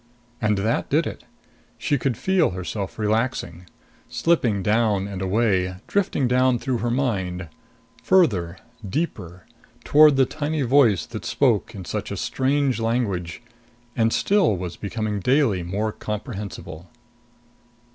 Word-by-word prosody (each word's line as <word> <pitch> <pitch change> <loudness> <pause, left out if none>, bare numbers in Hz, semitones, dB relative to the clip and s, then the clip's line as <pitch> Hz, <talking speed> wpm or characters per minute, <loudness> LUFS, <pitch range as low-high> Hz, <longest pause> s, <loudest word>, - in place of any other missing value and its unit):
And 105 -2 +2
that 110 +4 -1
did - - +2
it. - - -7 0.5
She 145 - 0
could 125 -3 -1
feel 190 -4 +2
herself 95 +2 -5
relaxing, 105 -5 -1 0.4
slipping 120 - +1
down 105 -2 +1
and 95 -2 -6
away, 95 -2 +1
drifting 185 -9 0
down 125 0 +3
through 125 0 -2
her 120 - -1
mind... 95 - -2 0.5
farther... 100 - +2 0.3
deeper... 95 - -4 0.4
toward 150 -1 +6
the 135 -1 +4
tiny 145 +2 -2
voice 120 - +4
that - - -8
spoke - - +1
in 95 -3 -7
such - - -4
a - - -4
strange 135 -1 0
language 115 -5 -2 0.5
and 115 -1 +2
still 190 - +2
was 90 -1 -5
becoming 105 0 -3
daily 125 -3 +2
more 100 +5 -2
comprehensible. 100 -6 -7
110 Hz, 125 wpm, -23 LUFS, 95-130 Hz, 0.5 s, toward